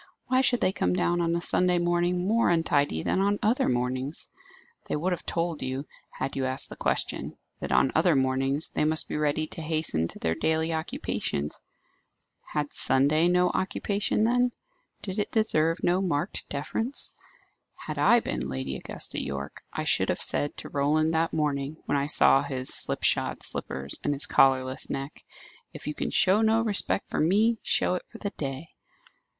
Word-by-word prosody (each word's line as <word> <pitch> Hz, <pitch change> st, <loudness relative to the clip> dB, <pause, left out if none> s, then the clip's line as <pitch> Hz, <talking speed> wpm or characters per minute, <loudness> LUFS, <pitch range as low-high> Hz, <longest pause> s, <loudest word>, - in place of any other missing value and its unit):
Why 255 Hz, 0 st, +3 dB
should 245 Hz, -2 st, +2 dB
they 185 Hz, -, +3 dB
come 90 Hz, -, -1 dB
down 175 Hz, -, +1 dB
on 170 Hz, 0 st, 0 dB
a 170 Hz, -, -1 dB
Sunday 180 Hz, 0 st, +2 dB
morning 175 Hz, +1 st, 0 dB
more 230 Hz, +2 st, +2 dB
untidy 145 Hz, -, +1 dB
than 190 Hz, -, 0 dB
on 200 Hz, +1 st, +1 dB
other 220 Hz, +4 st, +2 dB
mornings? 130 Hz, +4 st, -1 dB, 0.6 s
They -, -, 0 dB
would 170 Hz, +5 st, -1 dB
have 180 Hz, -, -4 dB
told 165 Hz, -2 st, -2 dB
you, 130 Hz, +2 st, -4 dB, 0.3 s
had 135 Hz, +1 st, -3 dB
you 130 Hz, -1 st, -1 dB
asked 130 Hz, +1 st, 0 dB
the -, -, -8 dB
question, -, -, -2 dB, 0.2 s
that -, -, -5 dB
on 65 Hz, +1 st, +3 dB
other 165 Hz, 0 st, +3 dB
mornings 135 Hz, +2 st, 0 dB
they -, -, -1 dB
must 155 Hz, +1 st, +2 dB
be -, -, -5 dB
ready 150 Hz, +1 st, 0 dB
to 165 Hz, -, -8 dB
hasten 155 Hz, -, -1 dB
to -, -, -10 dB
their 80 Hz, -, -1 dB
daily 160 Hz, -, 0 dB
occupations. 75 Hz, -, -3 dB, 0.9 s
Had 145 Hz, -1 st, -2 dB
Sunday 145 Hz, +5 st, +4 dB
no 180 Hz, 0 st, +3 dB
occupation, 200 Hz, +2 st, 0 dB
then? 245 Hz, +1 st, +2 dB, 0.5 s
Did 195 Hz, +1 st, -4 dB
it 205 Hz, -, -1 dB
deserve 165 Hz, -7 st, +2 dB
no 180 Hz, +2 st, +2 dB
marked 150 Hz, -6 st, -2 dB
deference? 225 Hz, -, +2 dB, 0.6 s
Had -, -, -7 dB
I 235 Hz, 0 st, +5 dB
been 70 Hz, -, -4 dB
Lady 65 Hz, 0 st, -4 dB
Augusta -, -, -3 dB
Yorke, 70 Hz, 0 st, -6 dB
I -, -, -4 dB
should -, -, +1 dB
have -, -, -1 dB
said 145 Hz, -, 0 dB
to -, -, -7 dB
Roland 155 Hz, +3 st, +1 dB
that 165 Hz, +1 st, +1 dB
morning, 150 Hz, -1 st, -2 dB
when -, -, -1 dB
I 140 Hz, 0 st, 0 dB
saw 135 Hz, -2 st, +5 dB
his 130 Hz, -2 st, 0 dB
slip -, -, +1 dB
shod -, -, +1 dB
slippers 70 Hz, +2 st, 0 dB
and 145 Hz, -, 0 dB
his 140 Hz, -, -1 dB
collarless 130 Hz, -1 st, +2 dB
neck, 135 Hz, +1 st, -6 dB, 0.5 s
"If -, -, -9 dB
you 150 Hz, -, -3 dB
can -, -, -3 dB
show 195 Hz, +3 st, +3 dB
no 225 Hz, +1 st, +3 dB
respect 210 Hz, -3 st, +1 dB
for -, -, -1 dB
me, 215 Hz, +8 st, +2 dB
show -, -, +1 dB
it 180 Hz, -, -3 dB
for 230 Hz, -, -12 dB
the 205 Hz, -3 st, -4 dB
day." 140 Hz, +3 st, -6 dB
155 Hz, 180 wpm, -27 LUFS, 135-180 Hz, 0.9 s, I